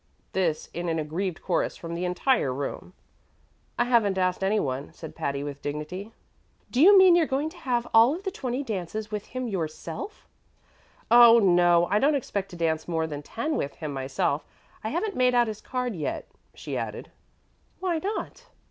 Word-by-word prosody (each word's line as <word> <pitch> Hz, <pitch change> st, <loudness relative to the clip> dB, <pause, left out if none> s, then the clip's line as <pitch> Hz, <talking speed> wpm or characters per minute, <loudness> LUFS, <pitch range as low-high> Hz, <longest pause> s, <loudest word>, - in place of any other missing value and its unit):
This 170 Hz, -5 st, 0 dB
in 175 Hz, 0 st, -3 dB
an 165 Hz, -, 0 dB
aggrieved 160 Hz, +3 st, -3 dB
chorus 180 Hz, -, 0 dB
from 170 Hz, 0 st, -7 dB
the 175 Hz, +2 st, -2 dB
entire 180 Hz, -, +1 dB
room. 140 Hz, +7 st, -5 dB, 0.8 s
"I -, -, +3 dB
haven't 230 Hz, -6 st, +2 dB
asked 185 Hz, 0 st, 0 dB
any 205 Hz, +3 st, +2 dB
one," 135 Hz, -2 st, -3 dB
said 160 Hz, -, -9 dB
Patty, 140 Hz, 0 st, -2 dB
with 145 Hz, -1 st, -6 dB
dignity. 150 Hz, +8 st, -5 dB, 0.6 s
"Do 250 Hz, -, +1 dB
you 395 Hz, +5 st, +9 dB
mean 375 Hz, -2 st, +8 dB
you're 335 Hz, -3 st, +3 dB
going 285 Hz, +4 st, -1 dB
to 355 Hz, -, -15 dB
have 245 Hz, -6 st, -1 dB
all 230 Hz, +6 st, +6 dB
of 370 Hz, -, -9 dB
the 385 Hz, -, -2 dB
twenty 255 Hz, -3 st, -3 dB
dances 215 Hz, -1 st, -4 dB
with 210 Hz, -1 st, -4 dB
him 255 Hz, -1 st, -4 dB
yourself?" 170 Hz, -, -5 dB, 0.8 s
"Oh, 235 Hz, -1 st, +9 dB
no; 175 Hz, -4 st, +4 dB
I 205 Hz, +4 st, +1 dB
don't 290 Hz, +4 st, +3 dB
expect 200 Hz, -7 st, -3 dB
to 180 Hz, -, -10 dB
dance 160 Hz, -2 st, -1 dB
more 165 Hz, -2 st, 0 dB
than 145 Hz, -2 st, -5 dB
ten 265 Hz, -, -3 dB
with 140 Hz, -, -3 dB
him 155 Hz, -3 st, -5 dB
myself 135 Hz, +2 st, -1 dB, 0.4 s
I 220 Hz, -, -2 dB
haven't 385 Hz, -, -2 dB
made 250 Hz, -1 st, +3 dB
out 240 Hz, 0 st, +5 dB
his 215 Hz, -1 st, -6 dB
card 250 Hz, -3 st, -3 dB
yet," 155 Hz, -4 st, -4 dB, 0.3 s
she -, -, -6 dB
added. -, -, -5 dB, 0.7 s
"Why 355 Hz, -4 st, 0 dB
not?" 430 Hz, +6 st, -5 dB
200 Hz, 185 wpm, -26 LUFS, 160-250 Hz, 0.8 s, you